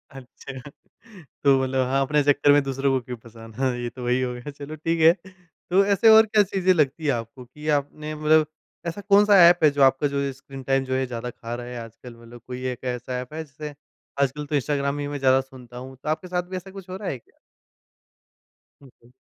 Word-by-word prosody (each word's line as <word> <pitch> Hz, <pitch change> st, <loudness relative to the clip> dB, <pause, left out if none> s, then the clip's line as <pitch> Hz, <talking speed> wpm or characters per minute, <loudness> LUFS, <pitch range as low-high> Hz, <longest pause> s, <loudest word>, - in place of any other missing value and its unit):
अच्छा 135 Hz, 0 st, -10 dB, 0.8 s
तो 135 Hz, -2 st, +5 dB
मतलब 130 Hz, 0 st, 0 dB
हाँ, 135 Hz, +1 st, +1 dB
अपने 150 Hz, +2 st, +2 dB
चक्कर 145 Hz, 0 st, +4 dB
में 145 Hz, 0 st, +5 dB
दूसरों 135 Hz, 0 st, -1 dB
को 130 Hz, -, +1 dB
क्यों 125 Hz, 0 st, -6 dB
फँसाना, 115 Hz, +3 st, -5 dB
ये 120 Hz, 0 st, -4 dB
तो 125 Hz, +2 st, -10 dB
वही 125 Hz, +1 st, +1 dB
हो 125 Hz, -1 st, -2 dB
गया 125 Hz, +4 st, -8 dB
चलो 145 Hz, +2 st, -9 dB
ठीक 165 Hz, +2 st, -2 dB
है, 160 Hz, +1 st, +8 dB, 0.6 s
तो 190 Hz, +3 st, +4 dB
ऐसे 205 Hz, +3 st, +4 dB
और 220 Hz, 0 st, +8 dB
क्या 210 Hz, -1 st, +3 dB
चीज़ें 190 Hz, -1 st, +1 dB
लगती 155 Hz, -1 st, 0 dB
है 145 Hz, -, +3 dB
आपको 120 Hz, +1 st, -5 dB
कि 150 Hz, +5 st, -11 dB
आपने 150 Hz, +2 st, -6 dB
मतलब 155 Hz, 0 st, +3 dB, 0.4 s
ऐसा 170 Hz, +4 st, -4 dB
कौन-सा 205 Hz, 0 st, +6 dB
ऐप 175 Hz, +1 st, +5 dB
है 155 Hz, -, +7 dB
जो 140 Hz, 0 st, -2 dB
आपका 135 Hz, +2 st, +4 dB
जो 140 Hz, 0 st, -2 dB
ये 140 Hz, 0 st, -1 dB
स्क्रीन 135 Hz, 0 st, -11 dB
टाइम 135 Hz, +1 st, +1 dB
जो 130 Hz, -, -3 dB
है 130 Hz, 0 st, 0 dB
ज़्यादा 125 Hz, -1 st, -5 dB
खा 120 Hz, 0 st, -7 dB
रहा 120 Hz, 0 st, -7 dB
है 125 Hz, 0 st, -7 dB
आजकल 115 Hz, +2 st, -13 dB
मतलब 120 Hz, 0 st, -14 dB
कोई 125 Hz, 0 st, -6 dB
एक 125 Hz, -, -9 dB
ऐसा 125 Hz, +1 st, -5 dB
ऐप 125 Hz, +4 st, -11 dB
है 160 Hz, +1 st, -4 dB
जिसे 150 Hz, 0 st, -9 dB, 0.5 s
आजकल 140 Hz, +2 st, -1 dB
तो 145 Hz, -, -3 dB
इंस्टाग्राम 140 Hz, 0 st, -1 dB
ही 145 Hz, -, -3 dB
मैं 145 Hz, 0 st, -5 dB
ज़्यादा 130 Hz, 0 st, +4 dB
सुनता 125 Hz, -2 st, -14 dB
हूँ, 130 Hz, +1 st, -9 dB
तो -, -, -3 dB
आपके 155 Hz, +4 st, -2 dB
साथ 180 Hz, 0 st, -1 dB
भी 185 Hz, -, -4 dB
ऐसा 190 Hz, +1 st, -9 dB
कुछ 195 Hz, -1 st, -11 dB
हो 185 Hz, -, -5 dB
रहा 200 Hz, -1 st, -4 dB
है? 130 Hz, -, -4 dB, 1.6 s
उ, -, -, -16 dB, 0.2 s
हुँ। 120 Hz, -, -21 dB
140 Hz, 230 wpm, -24 LUFS, 125-155 Hz, 1.6 s, है